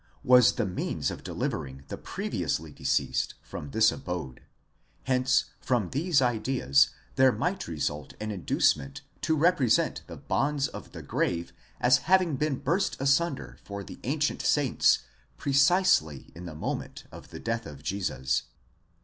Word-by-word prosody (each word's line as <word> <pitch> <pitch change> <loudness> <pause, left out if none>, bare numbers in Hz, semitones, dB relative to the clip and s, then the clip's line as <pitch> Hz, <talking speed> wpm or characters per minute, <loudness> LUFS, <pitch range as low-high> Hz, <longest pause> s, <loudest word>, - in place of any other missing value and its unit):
was 125 -2 +6
the 120 - 0
means 90 -2 -2
of - - -8
delivering 65 0 -4
the - - -4
previously 80 -1 -3
deceased - - -1
from 75 - -7
this 110 +8 +4
abode; 90 - -5 0.7
3 130 - +1
hence 130 +1 +3
from 120 -8 0
these 150 0 +2
ideas 110 - +3 0.3
there 130 0 +6
might 185 +9 -2
result 75 -3 -3
an 110 0 -3
inducement 135 +7 0 0.2
to 160 - +1
represent 155 -6 +2
the - - -9
bonds 140 0 0
of - - -10
the - - -8
grave 85 -1 -1 0.3
as 125 +1 +5
having 185 -5 +4
been 150 +1 0
burst 180 +9 -1
asunder 135 - 0
for 100 0 -6
the - - -10
_ - - -22
ancient 145 +3 -1
saints 145 -4 +3 0.3
precisely 140 - +3
in 90 +2 -9
the 80 - -8
moment - - -4
of - - -12
the - - -9
death 115 -2 -3
of 70 -2 -11
Jesus. 80 -10 -1
125 Hz, 150 wpm, -28 LUFS, 85-140 Hz, 0.7 s, was